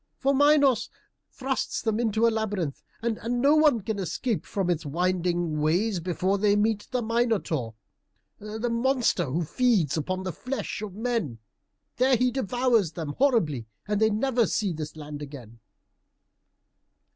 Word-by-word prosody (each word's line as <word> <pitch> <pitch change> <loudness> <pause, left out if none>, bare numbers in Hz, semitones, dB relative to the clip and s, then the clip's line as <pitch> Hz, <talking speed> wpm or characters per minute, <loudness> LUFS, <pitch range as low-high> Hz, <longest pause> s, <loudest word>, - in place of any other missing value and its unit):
For 275 +1 +1
Minos 285 -2 +4 0.4
thrusts 265 0 -2
them 220 -2 -1
into 225 -1 +2
a 230 - +2
labyrinth, 205 -9 -2 0.2
and 230 -2 -1 0.2
no 285 +4 +5
one 300 -7 +4
can 205 +1 -3
escape 205 +5 -2
from 195 -3 -2
its 170 -2 0
winding 175 0 0
ways, 180 +6 +1
before 185 +3 -1
they 205 0 +3
meet 210 0 0
the 250 -1 -1
Minotaur, 220 - 0 0.6
the 220 +3 -4
monster 235 -6 +1
who 150 +6 -1
feeds 200 - +1
upon 185 +4 -2
the 185 -2 -4
flesh 255 - -4
of 205 -3 -6
men. 225 - -2 0.6
There 255 +1 +4
he 250 +1 +2
devours 245 - +1
them 160 -3 -5
horribly, 170 - +2 0.2
and 210 0 0
they 220 - +5
never 235 +2 +1
see 200 -5 0
this 155 -1 -6
land 150 -1 -8
again." 125 -6 -10
210 Hz, 145 wpm, -26 LUFS, 170-240 Hz, 0.6 s, no